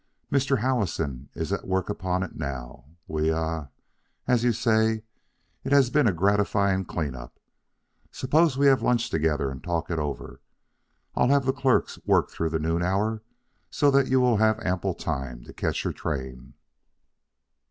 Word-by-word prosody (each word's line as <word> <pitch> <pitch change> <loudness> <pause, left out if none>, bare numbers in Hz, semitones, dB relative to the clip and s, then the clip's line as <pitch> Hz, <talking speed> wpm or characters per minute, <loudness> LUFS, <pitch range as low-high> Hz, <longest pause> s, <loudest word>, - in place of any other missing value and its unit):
Mr. 135 0 +2
Howison 85 - -1
is - - -3
at - - -4
work 95 0 0
upon 95 -2 -1
it 95 - -7
now. 65 -4 -6 0.2
We 80 0 0
ah 80 -2 -2 0.6
as 120 -2 +3
you 120 - +4
say, 110 -1 +1 0.6
it 135 - -4
has 140 -3 +5
been 145 -3 +3
a - - +4
gratifying 100 +1 +1
clean 75 -6 -3
up. - - -11 0.7
Suppose 150 +2 +2
we 140 - +3
have 135 -2 +5
lunch 120 -2 +1
together 75 -3 0
and 65 - -9
talk 85 0 -2
it 85 - -1
over. 70 -4 -5 0.7
I'll - - +3
have 140 0 +3
the 130 - +2
clerks 135 -2 +1
work - - +2
through 80 - -2
the 80 - -1
noon 80 +2 -1
hour, 105 +5 0 0.5
so 145 -1 +3
that 140 -1 +3
you 130 0 +3
will 125 -3 +3
have 110 +1 +3
ample 90 -4 -1
time 60 -3 -4
to - - -12
catch - - -2
your - - -2
train." 65 -4 -5
95 Hz, 165 wpm, -26 LUFS, 80-125 Hz, 0.7 s, has